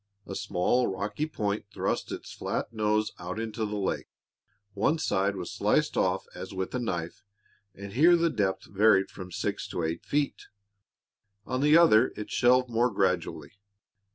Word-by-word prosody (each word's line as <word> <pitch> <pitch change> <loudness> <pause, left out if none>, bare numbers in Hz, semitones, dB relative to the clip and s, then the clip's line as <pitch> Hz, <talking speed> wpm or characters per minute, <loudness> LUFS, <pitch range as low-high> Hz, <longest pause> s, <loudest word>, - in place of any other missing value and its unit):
A - - -7
small, 105 +7 +1
rocky 100 +11 -3
point 105 -8 -3
thrust - - -2
its - - -7
flat - - -3
nose 110 0 +1
out 90 +4 -5
into 110 -1 -3
the 105 - -4
lake. 95 -2 -2 0.7
One 105 +11 +1
side 100 -9 0
was 90 -3 -5
sliced - - +1
off - - +1
as - - -8
with 95 0 -3
a 125 - -1
knife, 90 -8 -4 0.5
and 100 0 -9
here 165 +8 +6
the 170 -1 +2
depth 100 -7 -1
varied 100 -1 +3
from 90 -2 -9
six - - -3
to 85 - -3
eight 80 +1 -2
feet; 145 0 -1 1.0
on 130 +1 -2
the 150 +2 +6
other 130 -8 +5
it 105 - -7
shelved 125 +1 +4
more 120 +1 +2
gradually. 95 -5 -1
105 Hz, 160 wpm, -28 LUFS, 95-125 Hz, 1.0 s, here